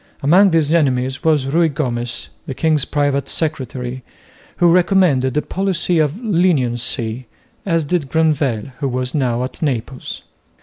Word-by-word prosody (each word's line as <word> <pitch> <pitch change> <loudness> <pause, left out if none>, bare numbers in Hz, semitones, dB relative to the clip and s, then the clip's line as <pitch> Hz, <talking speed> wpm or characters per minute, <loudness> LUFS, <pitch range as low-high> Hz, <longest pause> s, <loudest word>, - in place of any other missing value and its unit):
Among 185 +8 +5
these 160 -3 +2
enemies 130 -4 +1
was 155 -5 +2
Ruy 160 +4 +2
Gomez, 120 -5 -3 0.2
the 135 - -5
king's 155 -2 +1
private 145 -1 0
secretary, 130 -5 -3 0.6
who 175 -1 +4
recommended 175 -8 +3
a 150 - +1
policy 185 -3 -1
of 155 +5 0
leniency, 130 - 0 0.4
as 165 -3 +1
did 145 -2 -1
Granvelle, 140 -7 0
who 140 - -1
was 125 0 -3
now 125 -4 0
at 130 - -7
Naples. 130 -3 -3
145 Hz, 135 wpm, -18 LUFS, 130-165 Hz, 0.6 s, Among